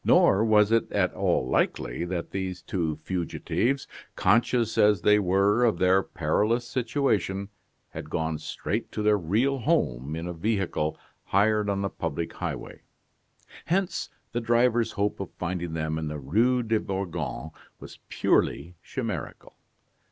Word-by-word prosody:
Nor 100 +3 +5
was 105 -1 +4
it 115 0 +2
at 90 -3 +1
all 65 - +1
likely 65 +4 0
that 90 -1 -4
these 95 -2 -4
two 80 -5 -2
fugitives, 100 - -1 0.3
conscious 115 +2 +2
as 105 -4 +4
they 105 +2 +5
were 100 +4 +3
of 115 -7 +3
their 95 +2 +4
perilous 105 +10 0
situation, 115 -6 0 0.4
had - - -8
gone 80 -1 -2
straight - - -4
to 105 - -2
their 105 -1 +4
real 115 +11 +1
home 75 - 0
in 80 +1 -4
a 90 - -4
vehicle 90 -4 -1 0.3
hired 105 +1 +2
on 100 0 -1
the 100 - 0
public 80 +3 -4
highway. - - -5 0.8
Hence, 185 +1 -1 0.2
the 120 - -2
driver's 120 0 +2
hope 100 0 -1
of 95 - -4
finding 85 -2 -3
them 80 -1 -2
in 80 - -3
the 75 0 -4
Rue 115 - +2
de 110 -1 +1
Bourgogne 85 -6 -4 0.3
was - - -11
purely 85 +5 +1
chimerical. 110 - -5
100 Hz, 145 wpm, -27 LUFS, 85-115 Hz, 0.8 s, Nor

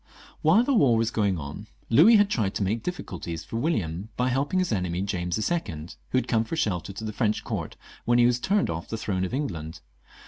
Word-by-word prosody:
While 180 +10 +5
the 275 - +1
war 135 - +4
was 115 0 +1
going 100 -5 +1
on 75 +8 -7 0.2
Louis 170 - +7
had 205 -1 +5
tried 110 - -1
to - - 0
make 110 +4 -1
dififtculties 90 - -5
for 115 - -5
William 105 - -1
by 125 +1 +1
helping 140 +7 0
his 185 -5 +1
enemy, 90 -3 -1
James 90 -3 -2
XL, 110 +9 0 0.6
who - - +1
had 130 - 0
come 115 -2 +2
for 115 - -4
shelter 100 - -1
to 100 +3 -8
the 110 -1 -4
French 110 -2 0
court - - -4 0.3
when 120 0 +3
he 120 - +6
was 125 0 +3
turned 200 +8 +1
off 85 0 -5
the 115 - -4
throne 95 -4 -2
of - - -5
England. 85 - -4
110 Hz, 220 wpm, -26 LUFS, 95-135 Hz, 0.6 s, Louis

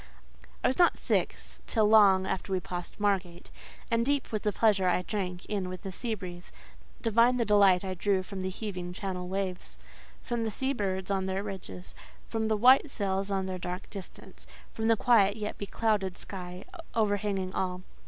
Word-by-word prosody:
I - - +5
was 260 - -1
not 350 - +5
sick - - 0 0.3
till 220 -2 +2
long 200 -3 +6
after 190 +1 -3
we 190 - +1
passed 175 +1 -7
Margate, 185 -4 -1 0.4
and 230 0 +3
deep 285 +1 0
was 215 -2 -1
the 210 - +1
pleasure 205 -3 +3
I 180 0 +2
drank 180 -3 -4
in 195 -3 -2
with 185 -1 -7
the 195 - -5
sea 225 +4 -3
breeze; 180 -3 -9 0.5
divine 230 +2 +4
the 235 - +1
delight 200 -3 +5
I 190 - -2
drew 190 +1 +1
from 190 0 -6
the 185 - -2
heaving 185 -3 -5
Channel 180 -1 -4
waves, 190 -1 -4 0.5
from 235 -2 -2
the 225 - -1
sea 265 +6 -1
birds 190 -4 -2
on 190 -1 0
their 190 +1 -2
ridges, 190 -2 -8 0.3
from 225 -1 -1
the 220 -1 +1
white 260 +6 +6
sails 195 -4 -1
on 195 -1 0
their 185 -1 -4
dark 180 +2 -6
distance, 195 -3 -10 0.3
from 220 0 -2
the 225 -1 +4
quiet 205 -3 +4
yet 210 -1 -5
beclouded 200 -2 -1
sky, 180 -1 -8 0.3
overhanging 205 -3 0
all. 180 -1 -2
195 Hz, 185 wpm, -29 LUFS, 185-220 Hz, 0.5 s, long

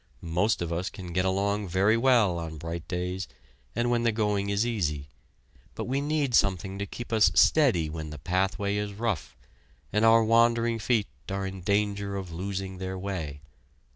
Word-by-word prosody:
Most 100 +2 +2
of 85 0 -3
us 90 +4 -2
can 90 -5 -8
get 90 +1 +1
along 100 +2 0
very 95 +5 +3
well 115 -8 +3
on 80 -1 -6
bright 85 +2 -6
days, 90 +1 -3 0.5
and 120 +1 +1
when 120 -1 +2
the 120 -1 +2
going 105 -2 0
is 100 +3 +1
easy, 75 -12 -2 0.7
but - - -3
we 135 +3 -1
need 145 -3 0
something 95 -2 +1
to 100 - -3
keep 120 +2 -7
us 105 -6 +5
steady 90 - +4
when 80 0 -6
the 75 - -7
pathway 95 +6 0
is 105 0 -3
rough, 110 - -3 0.6
and 105 +2 +2
our 115 0 +6
wandering 115 +1 +3
feet 110 -1 +1 0.2
are 95 0 -2
in 95 -1 -6
danger 100 +1 0
of 95 -3 -5
losing 95 +2 -4
their 95 0 -4
way. 85 -7 -5
100 Hz, 175 wpm, -27 LUFS, 90-110 Hz, 0.7 s, our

